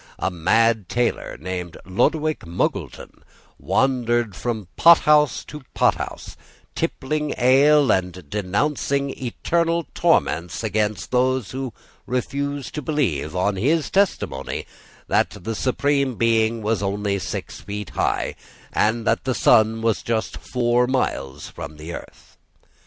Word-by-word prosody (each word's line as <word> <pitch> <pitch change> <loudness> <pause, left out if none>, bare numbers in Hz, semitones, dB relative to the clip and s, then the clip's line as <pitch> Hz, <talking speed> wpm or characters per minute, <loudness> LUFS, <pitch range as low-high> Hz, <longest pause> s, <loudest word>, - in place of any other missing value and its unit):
A - - -1
mad 110 +4 +2
tailor, 120 -1 -1
named 90 0 -5
Lodowick 155 - +1
Muggleton, 85 - -3 0.4
wandered 120 -5 +1
from 110 -5 -3
pothouse 150 -3 +5
to 150 - -9
pothouse, - - 0 0.4
tippling 150 +2 -2
ale, 140 +3 +5
and 90 -3 -1
denouncing 135 - -1
eternal 165 +7 -1
torments 85 +6 +1
against 105 -3 -1
those 130 -3 +1
who 130 -1 -4 0.4
refused 140 +2 -3
to 150 - -3
believe, 110 - -1
on 95 +2 +1
his 150 - +1
testimony, 190 - 0 0.4
that - - +1
the 115 - -2
Supreme 135 +2 0
Being 115 -1 +2
was 105 -1 0
only 100 0 -1
six 85 - -5
feet 105 -1 -6
high, - - 0 0.4
and 110 +2 +1
that - - +1
the 130 -1 -1
sun 110 +1 +4
was 115 -2 +1
just 110 -5 -2
four 120 0 +1
miles 70 - -2
from 75 +1 -9
the 80 +3 -7
earth. - - -11
115 Hz, 120 wpm, -22 LUFS, 100-135 Hz, 0.4 s, pothouse